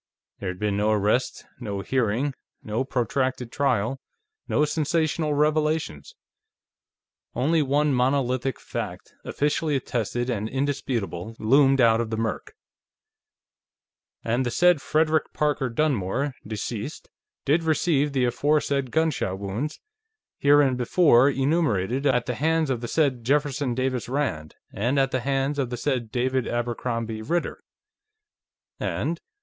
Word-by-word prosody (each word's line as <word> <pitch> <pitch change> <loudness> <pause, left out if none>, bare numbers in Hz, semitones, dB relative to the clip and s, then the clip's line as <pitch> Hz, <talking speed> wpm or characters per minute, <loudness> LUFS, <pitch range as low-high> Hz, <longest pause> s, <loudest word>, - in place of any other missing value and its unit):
There 95 - -3
had 90 - -5
been 105 0 -1
no 105 +1 +1
arrest, 110 +4 +1
no 100 -5 -4
hearing, 125 +5 0 0.3
no 110 +4 -1
protracted 130 -1 -1
trial, 125 -2 0 0.5
no 150 - +2
sensational 155 0 0
revelations. 150 - 0 1.2
Only 155 +6 +2
one 145 +1 +2
monolithic 130 0 0
fact, - - -6
officially 150 +1 0
attested 120 -2 -2
and 110 -3 -2
indisputable, 120 -7 -2
loomed 135 +4 +4
out 115 -2 +5
of 115 - -3
the 110 - -3
murk: 115 -1 -3 0.8
"... - - -62
and 120 +3 +1
the 120 - -1
said 175 +3 +4
Frederick 155 +1 +1
Parker 145 -3 0
Dunmore, 135 0 0
deceased, 110 -2 -5 0.3
did 155 +5 +3
receive 155 -2 +1
the 130 -2 +1
aforesaid 140 +1 +1
gunshot 155 -11 0
wounds, 100 +10 -4 0.6
hereinbefore 140 0 +4
enumerated, 135 - +1
at 125 -3 +2
the 125 - -2
hands 160 +3 +1
of 120 -3 -2
the 120 - -4
said 135 -4 +1
Jefferson 140 -1 0
Davis 130 -2 -1
Rand 125 - -2 0.2
and 120 +7 0
at 135 -1 +2
the 130 - 0
hands 135 +3 -1
of 130 -3 0
the 125 - -4
said 120 -3 -2
David 130 0 0
Abercrombie 115 -2 -2
Ritter 170 +10 -2 0.7
..." - - -62
and 170 +1 -2
130 Hz, 130 wpm, -25 LUFS, 115-145 Hz, 1.2 s, out